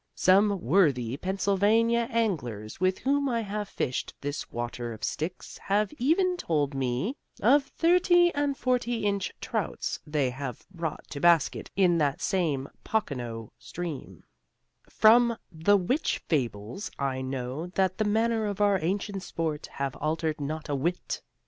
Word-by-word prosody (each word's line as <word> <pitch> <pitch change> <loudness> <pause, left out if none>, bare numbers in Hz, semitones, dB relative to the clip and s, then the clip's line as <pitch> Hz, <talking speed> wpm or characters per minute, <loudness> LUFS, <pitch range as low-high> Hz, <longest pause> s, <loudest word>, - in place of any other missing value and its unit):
Some 200 +1 +4
worthy 130 - +3
Pennsylvania 205 +6 +2
anglers 145 - -2
with 185 0 +2
whom 280 +1 +1
I 235 -2 0
have 205 -1 -4
fished 125 - -3
this 145 +1 -5
water 120 0 -4
of 110 - -12
Styx 165 +4 -4
have 205 +5 0
even 355 +8 +2
told 150 - 0
me 135 - -1 0.2
of 270 +6 +4
thirty 350 +3 +4
and 285 -2 0
forty 245 -3 0
inch 200 -2 0
trouts - - -3
they 145 -4 +1
have 130 -2 -6
brought 165 -4 -5
to 140 - -5
basket 170 -1 +3
in 180 -3 +4
that 140 -2 +1
same 150 -8 0 0.2
Pocono 120 - -3
stream, 150 +5 -7 0.7
from 235 +1 +5
the 175 +5 +3
which 245 - 0
fables 120 - -2
I 135 -2 -1
know 130 +4 -4
that 185 +1 0
the - - +3
manners 220 +1 +1
of 200 0 -5
our 205 -2 +3
ancient 195 +3 -2
sport 160 -4 -3
have 140 -2 -3
altered 155 0 -1
not 155 +2 -4
a 145 - -2
whit. 165 +6 -2
180 Hz, 140 wpm, -28 LUFS, 140-220 Hz, 0.7 s, from